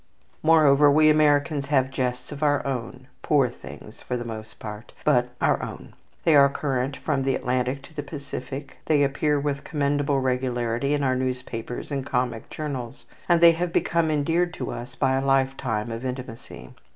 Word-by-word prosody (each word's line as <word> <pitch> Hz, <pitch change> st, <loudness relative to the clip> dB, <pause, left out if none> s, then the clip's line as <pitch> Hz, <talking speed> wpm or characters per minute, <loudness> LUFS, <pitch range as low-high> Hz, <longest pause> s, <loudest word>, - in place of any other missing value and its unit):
Moreover, 150 Hz, -3 st, +5 dB
we 155 Hz, +2 st, +5 dB
Americans 145 Hz, -1 st, +2 dB
have 135 Hz, -2 st, +2 dB
jests 125 Hz, 0 st, -3 dB
of 145 Hz, 0 st, -7 dB
our 145 Hz, -1 st, +2 dB
own, 125 Hz, -1 st, -4 dB, 0.2 s
poor 140 Hz, -4 st, +3 dB
things 110 Hz, -2 st, -12 dB
for 125 Hz, -, -3 dB
the 120 Hz, -, -5 dB
most 110 Hz, -1 st, -8 dB
part, 105 Hz, +1 st, -9 dB
but 125 Hz, 0 st, +3 dB
our -, -, +2 dB
own. -, -, -8 dB, 0.3 s
They 160 Hz, -, +4 dB
are 140 Hz, -1 st, +7 dB
current 135 Hz, -1 st, -2 dB
from 145 Hz, -4 st, -1 dB
the 135 Hz, -1 st, +1 dB
Atlantic 130 Hz, +1 st, -1 dB
to 160 Hz, -, -15 dB
the 150 Hz, -, -4 dB
Pacific, 140 Hz, -1 st, -7 dB
they 150 Hz, -2 st, +4 dB
appear 145 Hz, +1 st, +1 dB
with 140 Hz, -1 st, -2 dB
commendable 145 Hz, -1 st, 0 dB
regularity 125 Hz, +1 st, 0 dB
in 145 Hz, -, -1 dB
our 130 Hz, -1 st, +2 dB
newspapers 125 Hz, -1 st, -4 dB
and 135 Hz, -2 st, -2 dB
comic 125 Hz, -3 st, -2 dB
journals, 135 Hz, -4 st, -6 dB, 0.2 s
and 170 Hz, -1 st, +4 dB
they 170 Hz, 0 st, +9 dB
have 170 Hz, +1 st, -2 dB
become 170 Hz, -1 st, +1 dB
endeared 165 Hz, +4 st, +1 dB
to -, -, -4 dB
us 120 Hz, +1 st, -7 dB
by 130 Hz, 0 st, +1 dB
a 135 Hz, -, -1 dB
lifetime 130 Hz, -5 st, 0 dB
of 115 Hz, +2 st, -5 dB
intimacy. 125 Hz, -3 st, -7 dB
135 Hz, 175 wpm, -25 LUFS, 125-145 Hz, 0.3 s, they